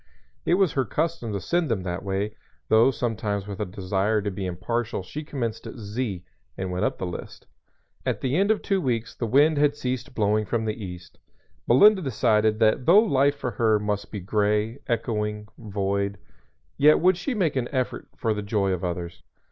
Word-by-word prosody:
It 175 Hz, -, +4 dB
was 190 Hz, -4 st, +3 dB
her 135 Hz, -, +1 dB
custom 155 Hz, -4 st, -2 dB
to 100 Hz, -, -2 dB
send 165 Hz, -, 0 dB
them 105 Hz, -5 st, -1 dB
that 90 Hz, 0 st, -3 dB
way, 100 Hz, +2 st, -2 dB, 0.3 s
though 110 Hz, +4 st, +6 dB
sometimes 110 Hz, -5 st, -2 dB
with 100 Hz, -2 st, -7 dB
a 105 Hz, -, -1 dB
desire 95 Hz, +2 st, 0 dB
to 100 Hz, -, -2 dB
be 95 Hz, 0 st, -4 dB
impartial 110 Hz, +4 st, -2 dB
she 150 Hz, +12 st, -6 dB
commenced 120 Hz, -7 st, -4 dB
at -, -, -8 dB
"Z" 105 Hz, -3 st, -4 dB, 0.3 s
and 95 Hz, -1 st, -3 dB
went 90 Hz, +2 st, -1 dB
up -, -, -1 dB
the -, -, -3 dB
list. 90 Hz, -, -7 dB, 0.6 s
At -, -, -2 dB
the 130 Hz, +1 st, 0 dB
end 195 Hz, +4 st, +2 dB
of 220 Hz, -, +2 dB
two 195 Hz, -2 st, +1 dB
weeks 115 Hz, -6 st, -1 dB
the 115 Hz, -, -3 dB
wind 145 Hz, +5 st, +4 dB
had 145 Hz, 0 st, +3 dB
ceased 130 Hz, -2 st, -4 dB
blowing 105 Hz, 0 st, +2 dB
from 110 Hz, +2 st, -1 dB
the 110 Hz, 0 st, -3 dB
east. 90 Hz, -2 st, -9 dB, 0.5 s
Melinda 200 Hz, -, +6 dB
decided 110 Hz, -, +2 dB
that 110 Hz, +3 st, +2 dB
though 175 Hz, +4 st, +8 dB
life 145 Hz, -10 st, +4 dB
for 125 Hz, -3 st, -4 dB
her 110 Hz, 0 st, +2 dB
must 105 Hz, -1 st, -3 dB
be 105 Hz, -, -4 dB
gray, 105 Hz, +4 st, 0 dB
echoing, 105 Hz, -3 st, -2 dB
void, 100 Hz, -2 st, -2 dB, 0.6 s
yet 150 Hz, +2 st, +6 dB
would 185 Hz, +2 st, +4 dB
she 250 Hz, +8 st, -3 dB
make 175 Hz, -9 st, +1 dB
an 125 Hz, -2 st, 0 dB
effort 130 Hz, -3 st, -2 dB
for 110 Hz, -2 st, 0 dB
the 105 Hz, -, -3 dB
joy 100 Hz, -1 st, 0 dB
of 90 Hz, -1 st, -2 dB
others. 85 Hz, -1 st, -4 dB
110 Hz, 195 wpm, -25 LUFS, 100-135 Hz, 0.6 s, though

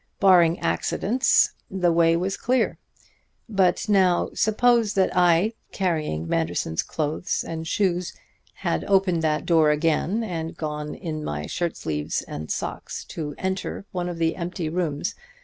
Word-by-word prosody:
Barring 175 Hz, -3 st, +5 dB
accidents, 250 Hz, +6 st, +2 dB, 0.2 s
the 180 Hz, -2 st, +1 dB
way 165 Hz, 0 st, +4 dB
was 190 Hz, +3 st, -1 dB
clear. 255 Hz, +1 st, 0 dB, 0.7 s
But 195 Hz, -3 st, +1 dB
now 190 Hz, -4 st, +3 dB
suppose 225 Hz, 0 st, +2 dB
that 190 Hz, -2 st, +2 dB
I, 180 Hz, +4 st, +4 dB, 0.2 s
carrying 155 Hz, -, -1 dB
Manderson's 80 Hz, 0 st, 0 dB
clothes 155 Hz, +3 st, -2 dB
and 160 Hz, -1 st, -5 dB
shoes, 180 Hz, -1 st, 0 dB, 0.4 s
had -, -, -1 dB
opened 190 Hz, -4 st, +2 dB
that 155 Hz, -1 st, 0 dB
door 160 Hz, -3 st, +4 dB
again 165 Hz, +8 st, +1 dB
and 165 Hz, -6 st, -4 dB
gone 150 Hz, -1 st, -4 dB
in 155 Hz, -4 st, -5 dB
my 75 Hz, -, -3 dB
shirt 170 Hz, -, -2 dB
sleeves 75 Hz, -1 st, -2 dB
and 75 Hz, +1 st, -7 dB
socks -, -, -4 dB
to 150 Hz, -3 st, -5 dB
enter 190 Hz, +1 st, -3 dB
one 180 Hz, -1 st, -2 dB
of 175 Hz, -, -5 dB
the 165 Hz, -1 st, +1 dB
empty 170 Hz, -2 st, -4 dB
rooms. 165 Hz, -2 st, -2 dB
170 Hz, 140 wpm, -24 LUFS, 155-190 Hz, 0.7 s, Barring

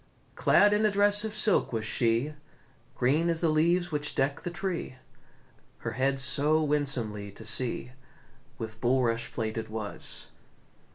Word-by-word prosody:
Clad 205 Hz, 0 st, +4 dB
in 210 Hz, +1 st, +2 dB
a 215 Hz, -, +4 dB
dress 205 Hz, +1 st, +3 dB
of 215 Hz, -1 st, -4 dB
silk 215 Hz, -2 st, +2 dB
was 110 Hz, -2 st, -2 dB
she, 115 Hz, +5 st, +1 dB, 0.6 s
Green 150 Hz, +7 st, +2 dB
as 165 Hz, -1 st, 0 dB
the 165 Hz, -, +1 dB
leaves 170 Hz, +3 st, +2 dB
which 150 Hz, -1 st, -2 dB
deck 140 Hz, +1 st, 0 dB
the -, -, -4 dB
tree, 175 Hz, -5 st, -4 dB, 0.8 s
Her 115 Hz, -, -5 dB
head 135 Hz, +3 st, 0 dB
so 140 Hz, +4 st, +3 dB
winsomely 125 Hz, -9 st, -1 dB
to 110 Hz, -, -11 dB
see 120 Hz, +1 st, 0 dB, 0.7 s
With 110 Hz, 0 st, -7 dB
bulrush 120 Hz, -2 st, +1 dB
plaited 110 Hz, -1 st, -4 dB
was. 110 Hz, -2 st, -4 dB
135 Hz, 145 wpm, -28 LUFS, 115-170 Hz, 0.8 s, Clad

